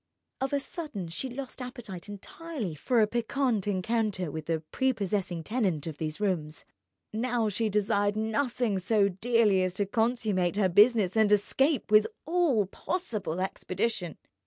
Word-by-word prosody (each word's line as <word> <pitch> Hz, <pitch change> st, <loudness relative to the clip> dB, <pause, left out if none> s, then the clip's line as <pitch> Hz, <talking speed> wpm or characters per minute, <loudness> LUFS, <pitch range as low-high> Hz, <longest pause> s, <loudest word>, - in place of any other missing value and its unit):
Of 265 Hz, 0 st, -1 dB
a 285 Hz, -, +2 dB
sudden 280 Hz, -, -6 dB
she 260 Hz, +11 st, -3 dB
lost 265 Hz, +1 st, -7 dB
appetite 240 Hz, -8 st, -7 dB
entirely 225 Hz, -, -6 dB
for 230 Hz, -, +1 dB
a -, -, +6 dB
piquant 235 Hz, -1 st, 0 dB
encounter 200 Hz, -3 st, 0 dB
with 155 Hz, 0 st, -6 dB
the 165 Hz, -1 st, 0 dB
prepossessing 200 Hz, -9 st, -1 dB
tenant 195 Hz, -, -1 dB
of 155 Hz, -3 st, -6 dB
these 155 Hz, -1 st, -3 dB
rooms. 165 Hz, -7 st, -2 dB, 0.5 s
Now 235 Hz, 0 st, 0 dB
she 220 Hz, +2 st, 0 dB
desired 205 Hz, 0 st, +1 dB
nothing 220 Hz, -1 st, 0 dB
so 200 Hz, +1 st, +3 dB
dearly 210 Hz, 0 st, +2 dB
as 185 Hz, -1 st, -1 dB
to 205 Hz, -, 0 dB
consummate 215 Hz, -4 st, 0 dB
her 200 Hz, -2 st, +2 dB
business 205 Hz, 0 st, +5 dB
and 220 Hz, -2 st, +4 dB
escape 265 Hz, +5 st, +2 dB
with 215 Hz, 0 st, +6 dB, 0.2 s
all 320 Hz, -, +2 dB
possible 210 Hz, -, -3 dB
expedition. 190 Hz, -1 st, -2 dB
210 Hz, 145 wpm, -29 LUFS, 185-240 Hz, 0.5 s, a